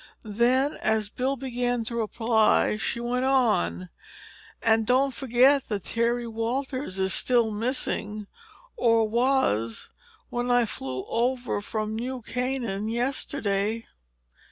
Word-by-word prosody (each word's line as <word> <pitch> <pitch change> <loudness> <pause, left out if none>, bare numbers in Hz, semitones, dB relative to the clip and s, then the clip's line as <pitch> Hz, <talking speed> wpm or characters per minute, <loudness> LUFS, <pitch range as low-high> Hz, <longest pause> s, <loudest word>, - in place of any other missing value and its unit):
Then, 245 +6 +1
as 220 -1 +1
Bill 265 +2 -1
began 245 -2 -2
to 235 +1 -5
reply, 225 -1 +2
she 230 - -2
went 245 +2 -1
on: 90 - +1 0.7
"And 220 -1 +3
don't 265 +2 +3
forget 265 +2 +3
that 205 -4 -2
Terry 235 +1 0
Walters 240 0 -3
is 190 0 0
still 235 -3 +2
missing—or 230 - -1
was, 225 - +1 0.4
when 245 0 -2
I 245 -1 +4
flew 130 -10 -5
over 245 -2 -1
from 215 +1 -3
New 250 +2 -4
Canaan 240 -5 -2
yesterday!" 230 -3 -1
235 Hz, 110 wpm, -26 LUFS, 215-255 Hz, 0.7 s, I